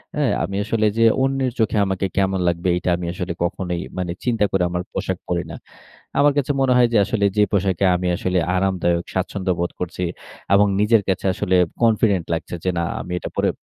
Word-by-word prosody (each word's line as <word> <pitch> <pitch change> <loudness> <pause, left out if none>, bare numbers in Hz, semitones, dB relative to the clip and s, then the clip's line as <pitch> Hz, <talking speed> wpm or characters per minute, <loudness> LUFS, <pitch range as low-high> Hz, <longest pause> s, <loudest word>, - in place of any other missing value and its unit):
হ্যাঁ? - - +1
আমি 100 - -4
আসলে 110 0 0
যে 115 - +4 0.2
অন্যের 135 -1 0
চোখে 110 -1 +1
আমাকে 95 0 -1
কেমন 95 -1 +1
লাগবে, 85 +1 0
এটা 90 - -2
আমি 90 - -5
আসলে 90 -1 -4
কখনোই 90 0 -2 0.2
মানে 90 -2 -2
চিন্তা 115 -4 +1
করে 95 -2 +1
আমার 90 0 -2
পোশাক 95 -1 -2
পরি 85 -1 -1
না। - - -7 0.6
আমার 145 +1 +5
কাছে 145 0 +1
মনে 130 -1 +3
হয় 120 -1 +5
যে 115 - +5
আসলে 105 -1 0
যে 105 - +6
পোশাকে 95 -1 +1
আমি 90 0 -1
আসলে 90 +1 -1 0.2
আরামদায়ক, 90 -2 +1
স্বাচ্ছন্দ্য 95 0 -1
বোধ 85 - -1
করছি 90 +1 -4 0.5
এবং 100 +1 +6
নিজের 105 +1 +4
কাছে 95 - -1
আসলে 95 -3 0 0.3
কনফিডেন্ট 110 -6 +3
লাগছে, 85 +1 -4
যে 95 - +1
না 85 - 0 0.2
আমি 90 - -6
এটা - - -6
পরে - - +2
95 Hz, 200 wpm, -21 LUFS, 90-105 Hz, 0.6 s, যে